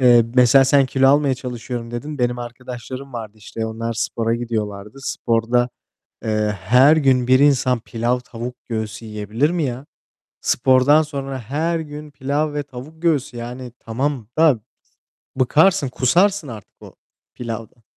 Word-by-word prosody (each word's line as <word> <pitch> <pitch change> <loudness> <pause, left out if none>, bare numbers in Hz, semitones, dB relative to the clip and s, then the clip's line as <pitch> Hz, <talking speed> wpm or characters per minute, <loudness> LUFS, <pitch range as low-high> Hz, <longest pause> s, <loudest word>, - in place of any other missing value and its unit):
Eee, 120 -2 +6
mesela 125 +2 +6
sen 135 0 +4
kilo 135 +1 +3
almaya 140 -1 +4
çalışıyorum, 120 -2 -6
dedin. 145 +5 -6
Benim 120 -1 0
arkadaşlarım 125 +2 -8
vardı, 110 -3 -6
işte, 110 +2 -5
onlar 115 +1 -4
spora 115 0 -1
gidiyorlardı. 110 -2 -4
Sporda, 120 -1 0 0.6
eee, 105 -1 0
her 130 - +5
gün 130 -5 +3
bir 130 0 +5
insan 130 -4 +3
pilav, 120 +2 -1
tavuk 125 0 -7
göğsü 110 -1 -4
yiyebilir 110 +6 -1
mi 175 -1 -1
ya? 130 +1 -4 0.5
Spordan 130 +4 +4
sonra 135 -3 -5
her 155 +8 -1
gün 150 -1 -8
pilav 145 +2 -1
ve 145 - -1
tavuk 145 +4 -11
göğsü, 145 -7 0
yani, 120 +1 -7
tamam 125 0 -2
da 155 -8 +5 0.8
bıkarsın, 150 +5 +3
kusarsın 170 +7 +2
artık 110 -5 -11
o - - -12 0.4
pilavdan. 115 0 -7
125 Hz, 140 wpm, -20 LUFS, 115-140 Hz, 0.8 s, Eee